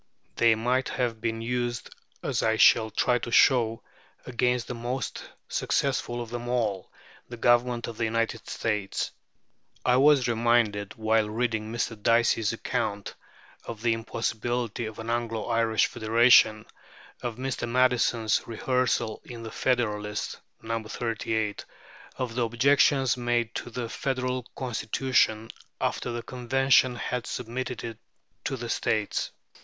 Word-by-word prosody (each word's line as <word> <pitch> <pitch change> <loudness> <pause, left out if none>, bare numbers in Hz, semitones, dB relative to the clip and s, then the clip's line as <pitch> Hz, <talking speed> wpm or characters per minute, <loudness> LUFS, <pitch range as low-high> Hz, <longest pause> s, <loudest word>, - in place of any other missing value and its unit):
They 115 -1 +4
might 125 +4 0
have 120 -3 -2
been 115 0 -2
used, 120 0 -2 0.3
as - - 0
I 110 0 +2
shall 110 0 +5
try 125 +3 +1
to 120 - -6
show, 115 -3 +4 0.4
against 125 0 0
the - - -5
most 120 +2 -4 0.3
successful 125 -3 -1
of 115 - -12
them 120 0 -5
all, 110 -7 -1 0.4
the 120 - -7
Government 120 0 +2
of 115 -2 -7
the 115 - 0
United 115 0 -2
States. 105 -3 -2 0.7
I 125 0 +4
was 140 -1 +5
reminded, 115 -3 +1
while 110 -1 +1
reading 110 -1 -1
Mr. 115 -2 -3
Dicey's 115 -1 +3
account 100 0 -3 0.5
of 115 -1 -7
the 115 -1 +3
impossibility 115 0 -2
of 110 - -9
an 115 +1 -4
Anglo 115 -2 -2
Irish 115 -1 +2
federation, 110 -1 +4 0.6
of 120 -2 -3
Mr. 130 -1 -3
Madison's 120 -3 +2
rehearsal 120 -1 0
in 120 -2 -9
the 110 - -7
Federalist 105 -5 -1 0.2
(No. 115 0 -2
38) 110 -1 -2 0.5
of 125 -3 -3
the 125 - -1
objections 130 +2 +3
made 120 -1 0
to - - -5
the 120 0 -4
Federal 130 0 -2
Constitution 115 -2 0 0.3
after 120 - -1
the 120 0 -4
Convention 130 +1 +2
had 125 0 -3
submitted 125 +1 -4
it 115 -2 -6 0.5
to 135 - -2
the 120 0 -5
States. 110 -2 0
120 Hz, 135 wpm, -27 LUFS, 110-125 Hz, 0.7 s, shall